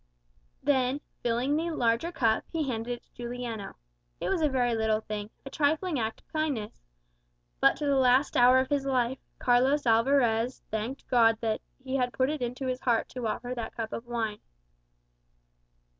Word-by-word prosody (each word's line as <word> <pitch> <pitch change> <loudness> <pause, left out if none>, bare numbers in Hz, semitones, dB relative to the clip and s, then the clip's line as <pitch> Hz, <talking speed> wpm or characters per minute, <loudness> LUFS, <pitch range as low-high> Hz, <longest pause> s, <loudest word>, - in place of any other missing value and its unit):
Then 265 -1 +2 0.2
filling 245 +4 +1
the 330 +2 0
larger 240 +1 +1
cup, 225 -9 +1
he 320 -4 -1
handed 230 -1 -3
it 240 - -9
to - - -36
Juliano. 240 -4 -5 0.4
It - - -2
was 370 -4 +1
a 305 - +3
very 245 -3 +1
little 220 -1 +1
thing, 210 -1 -5 0.2
a 270 - -7
trifling 310 +1 +1
act 220 -1 -3
of - - -39
kindness. 290 -9 -2 0.8
But - - +5
to 295 - -4
the 280 -1 +3
last 260 +2 +3
hour 250 +1 +7
of 260 +1 +1
his 280 -1 +1
life, 255 -1 +1 0.2
Carlos 260 +4 +3
Alvarez 235 0 +2
thanked 220 +6 -4
God 225 -2 +4
that 220 -2 -1 0.2
he 265 0 -3
had 250 -1 0
put 260 +2 +1
it 305 - -4
into 250 +2 -3
his 255 0 -2
heart 235 -3 +1
to 250 -3 -4
offer 245 +3 -3
that 235 -3 -5
cup 225 -1 -4
of 235 - -6
wine. 225 -3 -2
245 Hz, 175 wpm, -28 LUFS, 230-270 Hz, 0.8 s, hour